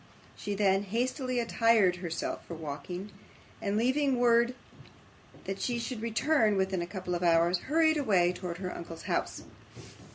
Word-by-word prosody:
She 205 Hz, 0 st, -4 dB
then 195 Hz, -1 st, +3 dB
hastily 250 Hz, +4 st, -1 dB
attired 230 Hz, -5 st, +3 dB
herself 175 Hz, -2 st, -4 dB
for 170 Hz, -, -6 dB
walking, 165 Hz, +6 st, -6 dB, 0.5 s
and 200 Hz, 0 st, -1 dB
leaving 260 Hz, +3 st, +2 dB
word 240 Hz, 0 st, +3 dB, 0.9 s
that 195 Hz, 0 st, -4 dB
she 245 Hz, -1 st, -1 dB
should 235 Hz, -1 st, -4 dB
return 230 Hz, -1 st, +2 dB
within 190 Hz, -1 st, 0 dB
a 170 Hz, -, -4 dB
couple 185 Hz, -1 st, -5 dB
of 175 Hz, -, -2 dB
hours, 170 Hz, +1 st, +3 dB
hurried 315 Hz, 0 st, +4 dB
away 185 Hz, -10 st, +3 dB
towards 180 Hz, -1 st, -6 dB
her 180 Hz, -1 st, -4 dB
uncle's 165 Hz, -1 st, -8 dB
house. -, -, -2 dB
200 Hz, 150 wpm, -30 LUFS, 180-240 Hz, 0.9 s, hurried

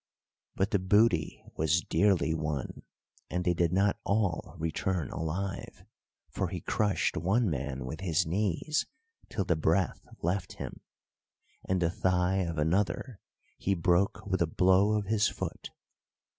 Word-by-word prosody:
But 95 Hz, +1 st, 0 dB
the 100 Hz, -, +3 dB
booty 95 Hz, -4 st, +2 dB
was 80 Hz, +2 st, +2 dB
dearly 85 Hz, -1 st, +2 dB
won, 75 Hz, -4 st, -3 dB, 0.5 s
and 90 Hz, 0 st, -2 dB
they 90 Hz, -, +3 dB
did 85 Hz, -1 st, +1 dB
not 100 Hz, +2 st, +2 dB
all 100 Hz, -5 st, 0 dB
return 80 Hz, 0 st, -2 dB
alive; 85 Hz, +4 st, -4 dB, 0.4 s
for -, -, -2 dB
he -, -, -4 dB
crushed 105 Hz, -2 st, 0 dB
one 100 Hz, +4 st, +1 dB
man 70 Hz, -2 st, -3 dB
with 70 Hz, +6 st, -6 dB
his 85 Hz, -2 st, +1 dB
knees 100 Hz, -, 0 dB, 0.4 s
till 100 Hz, -, -2 dB
the 85 Hz, -, +2 dB
breath 80 Hz, +4 st, 0 dB, 0.2 s
left 90 Hz, +2 st, -1 dB
him, -, -, -7 dB, 0.9 s
and 95 Hz, 0 st, +1 dB
the 85 Hz, -1 st, +1 dB
thigh 95 Hz, -2 st, +1 dB
of 85 Hz, -4 st, -1 dB
another 95 Hz, +8 st, 0 dB, 0.4 s
he 100 Hz, -, +1 dB
broke 90 Hz, +2 st, +1 dB
with 95 Hz, -2 st, -1 dB
a 85 Hz, -, +3 dB
blow 95 Hz, +5 st, +4 dB
of 105 Hz, -1 st, 0 dB
his 105 Hz, +1 st, +2 dB
foot. -, -, -5 dB
90 Hz, 145 wpm, -30 LUFS, 80-100 Hz, 0.9 s, blow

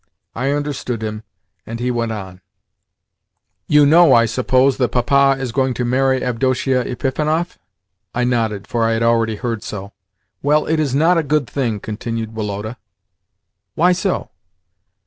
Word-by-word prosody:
I 130 Hz, +4 st, -2 dB
understood 140 Hz, -5 st, -3 dB
him, 110 Hz, 0 st, -4 dB, 0.4 s
and 115 Hz, +1 st, -7 dB
he 125 Hz, +1 st, -1 dB
went 115 Hz, -2 st, -1 dB
on: 95 Hz, -4 st, -7 dB, 1.3 s
"You 150 Hz, -1 st, +5 dB
know, 160 Hz, 0 st, +6 dB
I 115 Hz, 0 st, +5 dB
suppose, 130 Hz, +2 st, +2 dB
that 125 Hz, -2 st, +1 dB
Papa 135 Hz, +2 st, +3 dB
is 130 Hz, -3 st, -3 dB
going 130 Hz, 0 st, 0 dB
to 125 Hz, -, -2 dB
marry 130 Hz, +1 st, +1 dB
Avdotia 130 Hz, +1 st, 0 dB
Epifanov?" 155 Hz, +7 st, -2 dB, 0.6 s
I 125 Hz, -, +1 dB
nodded, 115 Hz, -4 st, -1 dB
for 120 Hz, -2 st, -1 dB
I 115 Hz, 0 st, +2 dB
had 115 Hz, +1 st, 0 dB
already 115 Hz, -1 st, +2 dB
heard 115 Hz, -1 st, -3 dB
so. 100 Hz, -3 st, -7 dB, 0.5 s
"Well, 150 Hz, +2 st, +2 dB
it 160 Hz, 0 st, 0 dB
is 140 Hz, -4 st, 0 dB
not 165 Hz, +4 st, +4 dB
a -, -, +2 dB
good 150 Hz, -1 st, 0 dB
thing," 120 Hz, -7 st, -2 dB
continued 110 Hz, +1 st, -5 dB
Woloda. 105 Hz, +2 st, -4 dB, 1.0 s
"Why 175 Hz, +3 st, +4 dB
so?" 180 Hz, -, -1 dB
125 Hz, 150 wpm, -19 LUFS, 115-140 Hz, 1.3 s, know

